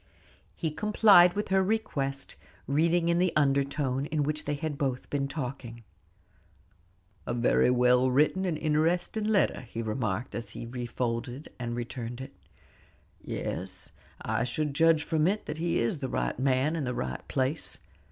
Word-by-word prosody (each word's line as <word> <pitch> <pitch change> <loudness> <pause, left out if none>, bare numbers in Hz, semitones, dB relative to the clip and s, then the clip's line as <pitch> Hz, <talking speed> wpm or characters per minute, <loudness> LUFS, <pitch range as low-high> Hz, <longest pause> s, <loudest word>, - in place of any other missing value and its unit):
He 160 -3 -2
complied 200 -1 +6
with 205 -1 -3
her 190 0 +4
request, 145 -10 -2 0.3
reading 165 +4 +2
in 170 0 +3
the 180 -1 +3
undertone 140 -1 +1
in 150 -1 0
which 150 +1 -2
they 145 - -1
had 155 0 -3
been 140 0 -2
talking. 125 -5 -6 1.4
"A - - -1
very 120 +1 +3
well 125 +1 +4
written 150 +8 +2
and 175 -5 -1
interesting 165 +7 0
letter," 215 -2 +2
he 115 -2 -6
remarked, 110 0 -2
as 115 - -5
he - - -7
refolded 120 +2 -4
and 120 -1 -3
returned 120 0 -5
it. 130 - -8 0.9
"Yes, 95 +1 -4 0.3
I 110 +1 -1
should 145 +4 -2
judge 160 +1 +4
from 160 -1 +1
it 205 +3 0
that 155 - -5
he 170 0 0
is 115 +6 0
the 130 -2 -3
right - - -2
man 135 +4 +2
in 160 - -2
the 125 -1 -2
right 65 0 -3
place. 135 +4 -1
140 Hz, 150 wpm, -29 LUFS, 125-160 Hz, 1.4 s, complied